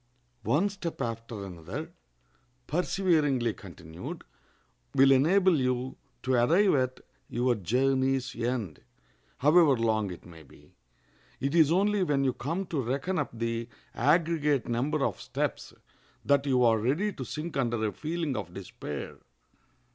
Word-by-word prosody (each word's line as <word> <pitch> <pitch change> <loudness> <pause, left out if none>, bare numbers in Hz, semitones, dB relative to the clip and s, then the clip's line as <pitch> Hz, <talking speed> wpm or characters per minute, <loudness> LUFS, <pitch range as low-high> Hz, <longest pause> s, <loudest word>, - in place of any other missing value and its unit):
One 155 - +2
step 190 -4 -6
after 115 -4 -4
another, 85 -4 -7 0.7
perseveringly 155 - +1
continued, 85 -3 -9 0.7
will 135 0 +6
enable 170 +5 +4
you 125 0 -1 0.3
to 130 - 0
arrive 165 +12 +4
at 130 -2 0 0.3
your 125 +1 +1
journey's 130 +5 0
end, 115 - -2 0.6
however 150 -1 +5
long 110 -3 +1
it 90 - -9
may 85 -2 -13
be. 70 - -19 0.7
It 140 +3 -1
is 160 -3 +5
only 200 +3 +2
when 145 -6 +1
you 130 -2 +1
come 165 +11 -3
to 155 -6 -2
reckon 140 +10 -1
up 145 - -1
the 115 0 -3 0.2
aggregate 150 -1 +2
number 135 +5 0
of - - -3
steps - - -3 0.5
that 140 0 +3
you 130 -2 +3
are 115 -2 +4
ready 155 - 0
to 135 - -6
sink 155 +6 -5
under 120 -4 0
a 105 - 0
feeling 160 -3 -3
of - - -5
despair. 75 -1 -7
135 Hz, 135 wpm, -28 LUFS, 115-155 Hz, 0.7 s, will